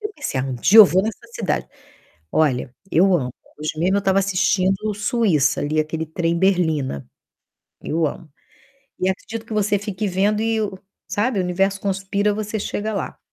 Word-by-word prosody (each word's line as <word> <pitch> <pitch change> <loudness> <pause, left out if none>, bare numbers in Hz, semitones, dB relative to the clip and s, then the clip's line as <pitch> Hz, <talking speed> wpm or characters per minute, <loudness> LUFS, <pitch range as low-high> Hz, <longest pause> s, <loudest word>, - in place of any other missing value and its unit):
Eu 420 - -3
pensei: 215 - -3
"Ah, - - -2
um 135 -1 -3
dia 195 - +5
eu 215 - +13
vou 185 +1 +2
nessa 220 +2 -5
cidade". 210 -5 -1 0.7
Olha, 130 -5 +1 0.2
eu 185 +3 +4
amo. 125 -7 -1 0.3
Hoje 155 +1 -4
mesmo 185 +4 +2
eu - - +3
estava 195 0 +2
assistindo 195 +2 +1
Suíça, 210 - +1
ali, 155 +2 0
aquele 160 +1 -3
trem 165 +1 -1
Berlina. 160 - 0 0.7
Eu 160 +1 0
amo. 155 +2 -6 0.7
E 185 - +1
acredito 215 +4 -4
que 225 - -9
você 210 -1 +1
fique 205 0 -4
vendo 200 +3 +1
e 225 0 0
o 200 -3 -3 0.3
sabe, 215 +1 0
o - - +1
universo 195 +2 0
conspira, 200 +1 0
você 215 +1 -3
chega 210 +1 -3
lá. 195 - -4
190 Hz, 175 wpm, -21 LUFS, 160-210 Hz, 0.7 s, eu